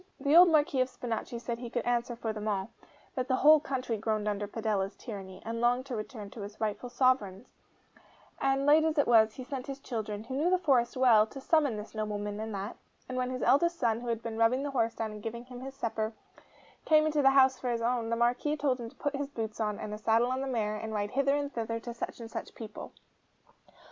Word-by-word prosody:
The 285 +2 +2
old 355 +1 +9
Marquis 295 -4 +3
of 255 - +1
Spinachi 240 0 -4
said 235 -1 -4
he 240 -1 -6
could 240 0 -2
answer 240 0 0
for 225 -1 -3
them 215 0 -5
all; 200 +1 -1 0.4
that 255 -1 -2
the 260 - +2
whole 305 +4 +7
country 255 -5 -3
groaned 215 0 -1
under 205 0 -1
Padella's 210 -2 -2
tyranny, 195 -5 -8
and 230 +1 -3
longed 245 +2 +2
to 260 -3 -4
return 215 -2 -6
to 225 - -9
its 205 +1 -8
rightful 220 +3 -2
sovereign; 245 -5 +1 0.9
and 270 0 +1
late 300 +2 +6
as 320 0 0
it 285 - +4
was, 220 -2 +5
he 260 - -7
sent 270 +1 -6
his 275 0 -5
children, 215 -5 -4
who 260 +3 -6
knew 305 +6 +2
the 370 - +4
forest 265 -8 +2
well, 230 -4 +6
to 270 - -9
summon 285 -5 +2
this 210 +1 -8
nobleman 210 -1 -3
and 220 0 -4
that; 200 +3 -5 0.3
and 255 - -5
when 255 0 -1
his 255 0 -3
eldest 340 +5 +3
son, 230 -4 +1
who 245 - -7
had 230 -1 -2
been 225 -1 -4
rubbing 245 +4 +3
the 285 - -3
horse 230 -4 0
down 220 -1 -3
and 210 0 -9
giving 235 +2 -6
him 250 -1 -10
his 270 +1 -8
supper, 220 -3 -2 0.7
came 310 -1 +5
into 305 -1 +2
the 270 - +6
house 265 -1 +5
for 250 - -2
his 230 -1 -1
own, 235 -1 0
the 230 - +1
Marquis 245 +6 +1
told 275 -3 0
him 230 -1 -6
to - - -22
put 290 -1 -2
his 280 0 -2
boots 225 -6 -5
on, 210 -2 -1
and 210 - -6
a 210 - -6
saddle 225 +3 +2
on 260 +1 -1
the 270 - -3
mare, 215 -4 -1
and 220 0 -5
ride 205 0 -2
hither 275 +1 +2
and 285 0 -2
thither 230 0 -2
to 235 +1 -7
such 235 - -6
and 225 -1 -8
such - - -6
people. 220 -2 -8
235 Hz, 245 wpm, -30 LUFS, 220-270 Hz, 0.9 s, old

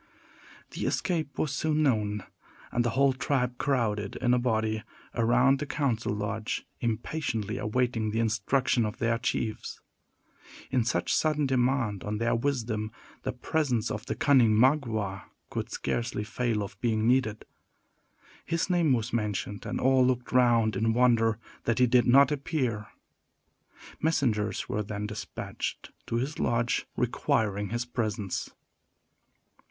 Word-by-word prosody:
The - - -3
escape 160 -6 -1
was 150 - 0
soon 155 +1 +1
known; 105 -7 +1 0.5
and 120 - +1
the 120 - +1
whole 140 -1 +5
tribe 125 -2 -1
crowded, 110 -7 0
in 125 -1 +1
a 125 - +3
body, 110 -3 0 0.3
around 125 +4 +3
the 150 - -3
council 130 -7 -1
lodge, 105 +1 -3
impatiently 115 -2 -2
awaiting 115 -1 0
the 110 +2 -1
instruction 115 +3 +1
of 105 -1 -3
their 115 0 +1
chiefs. 115 -3 -2 0.9
In 130 -3 +2
such 120 - 0
a - - +3
sudden 150 -2 +2
demand 125 -5 +1
on 105 +1 -2
their 115 +2 +1
wisdom, 115 -4 -1 0.3
the 130 - -2
presence 125 -3 -1
of 110 0 -5
the - - -2
cunning 120 -7 +4
Magua 110 -7 +1 0.3
could - - -3
scarcely 115 -3 -2
fail 110 -1 -1
of 100 0 -9
being 110 -2 +1
needed. 120 -4 +1 1.0
His 165 +2 -1
name 170 -6 +3
was 115 -1 -1
mentioned, 105 -2 -2
and - - -2
all 130 0 +4
looked 125 -1 0
round 120 -4 +4
in 110 +3 +1
wonder 115 -3 +3 0.3
that 115 - +1
he 125 - +5
did 125 0 +3
not 140 +3 +6
appear. 130 -8 -1 1.1
Messengers 125 -10 0
were 105 - -1
then 105 0 -4
despatched 105 0 -5 0.2
to - - -2
his 130 +6 -2
lodge 120 0 0
requiring 105 -2 0
his 120 +1 -2
presence. 110 -5 -3
120 Hz, 140 wpm, -28 LUFS, 110-130 Hz, 1.1 s, not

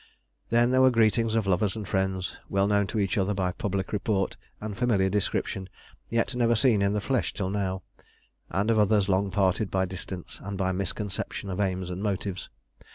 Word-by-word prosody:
Then 120 +1 +4
there 130 0 +4
were 130 - +7
greetings 115 -1 +3
of 110 -2 +2
lovers 95 +2 +1
and 105 -3 -5
friends, 95 -1 -1
well 100 0 +2
known 100 -1 +2
to 100 - -4
each 100 0 +1
other 100 +2 +1
by 95 -2 0
public 95 +1 -3
report 100 -1 0 0.2
and 105 -1 -5
familiar 100 -5 +2
description, 95 -1 -1 0.4
yet 115 0 0
never 120 -1 +3
seen 110 -3 +3
in 100 0 +2
the 105 - +1
flesh 130 +3 0
till 95 -2 -2
now, 95 -2 -2 0.7
and 100 +6 +1
of 110 - +3
others 105 -1 +3
long 100 +1 +2
parted 95 +1 +1
by 95 0 +1
distance 95 -1 -7
and 100 0 -4
by 95 -1 +1
misconception 100 +1 -3
of 90 - -4
aims 95 -2 -1
and 90 +2 -4
motives. 100 -2 -2
100 Hz, 190 wpm, -27 LUFS, 95-110 Hz, 0.7 s, were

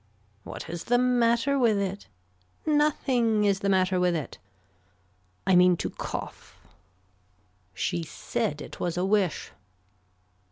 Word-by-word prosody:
What - - -8
is 170 0 -6
the 245 - +3
matter 245 +2 +2
with 225 -5 +3
it. 200 0 -3 0.6
Nothing 260 -8 +2
is 200 -1 +2
the 200 - -1
matter 185 -1 +2
with 180 -1 +2
it. 155 -4 -5 1.1
I 190 -1 +4
mean 180 0 +5
to - - -3
cough. - - -7 1.2
She 170 - -1
said 150 -1 -3
it - - -11
was 175 -1 -2
a 180 - +1
wish. 195 -4 0
200 Hz, 125 wpm, -27 LUFS, 180-240 Hz, 1.2 s, mean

